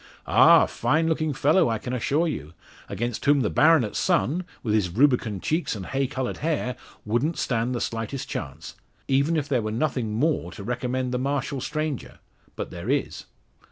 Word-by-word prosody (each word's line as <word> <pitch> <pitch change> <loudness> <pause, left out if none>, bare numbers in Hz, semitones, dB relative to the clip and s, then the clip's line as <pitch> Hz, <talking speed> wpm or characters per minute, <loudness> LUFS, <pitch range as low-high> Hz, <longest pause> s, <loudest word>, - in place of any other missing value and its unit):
Ah! - - +7
a - - 0
fine 160 +2 +1
looking 155 -1 0
fellow, 150 +4 +3
I 115 - 0
can 125 +3 -5
assure 145 +7 +1
you; 75 - -5 0.3
against 110 +4 -3
whom 145 -1 +4
the 105 - 0
baronet's 155 -9 +4
son, 175 -1 +1 0.2
with 110 -4 0
his 105 -4 +2
rubicund 115 -2 +2
cheeks 160 -5 0
and 95 -3 -6
hay 135 0 -1
coloured 130 -1 -3
hair, 145 -5 -1 0.3
wouldn't 120 +10 0
stand 120 0 -1
the 120 - -2
slightest 115 +4 -3
chance - - -6 0.3
even 140 +5 +2
were 155 - +1
there 135 -4 0
nothing: 110 +1 -1
more 135 - 0
to 100 - -9
recommend 125 +2 -2
the 125 - -1
martial 140 0 -2
stranger. 155 -2 -4 0.4
But - - -5
there 85 +6 -6
is." 140 0 -1
130 Hz, 175 wpm, -25 LUFS, 115-150 Hz, 0.4 s, Ah